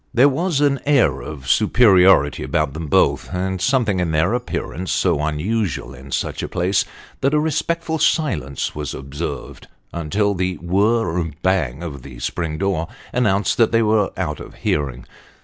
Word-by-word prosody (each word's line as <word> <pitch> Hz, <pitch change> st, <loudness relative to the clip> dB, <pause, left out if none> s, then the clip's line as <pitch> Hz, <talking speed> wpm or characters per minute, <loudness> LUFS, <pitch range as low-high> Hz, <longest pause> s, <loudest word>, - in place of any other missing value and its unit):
There 125 Hz, +4 st, +6 dB
was 155 Hz, +1 st, 0 dB
an 140 Hz, -2 st, +2 dB
air 140 Hz, -, +3 dB
of 70 Hz, +1 st, -8 dB
superiority 95 Hz, -, +5 dB
about 70 Hz, -, -1 dB
them 80 Hz, +1 st, -5 dB
both, 70 Hz, -, +2 dB
and 95 Hz, 0 st, -2 dB
something 120 Hz, -6 st, +2 dB
in 90 Hz, -2 st, 0 dB
their 80 Hz, +6 st, +1 dB
appearance 95 Hz, -7 st, -3 dB
so -, -, +1 dB
unusual 85 Hz, +5 st, -2 dB
in 65 Hz, +2 st, -12 dB
such -, -, -2 dB
a -, -, -3 dB
place, 95 Hz, +2 st, 0 dB, 0.3 s
that 140 Hz, +3 st, +1 dB
a -, -, +4 dB
respectful 160 Hz, +1 st, -1 dB
silence 100 Hz, -, 0 dB
was 75 Hz, -3 st, -5 dB
observed 70 Hz, +1 st, -6 dB, 0.3 s
until 100 Hz, +5 st, 0 dB
the 90 Hz, -1 st, -1 dB
whirr 95 Hz, +1 st, +1 dB
r 85 Hz, -, -1 dB, 0.2 s
bang 85 Hz, -6 st, 0 dB
of 70 Hz, -6 st, -6 dB
the 65 Hz, -1 st, -11 dB
spring 80 Hz, +5 st, -3 dB
door 90 Hz, -3 st, -1 dB, 0.3 s
announced 105 Hz, -5 st, +1 dB
that 115 Hz, -, +4 dB
they 115 Hz, 0 st, +3 dB
were 105 Hz, -2 st, +2 dB
out 75 Hz, -5 st, -2 dB
of -, -, -10 dB
hearing. 70 Hz, -4 st, -2 dB
95 Hz, 165 wpm, -20 LUFS, 75-115 Hz, 0.3 s, There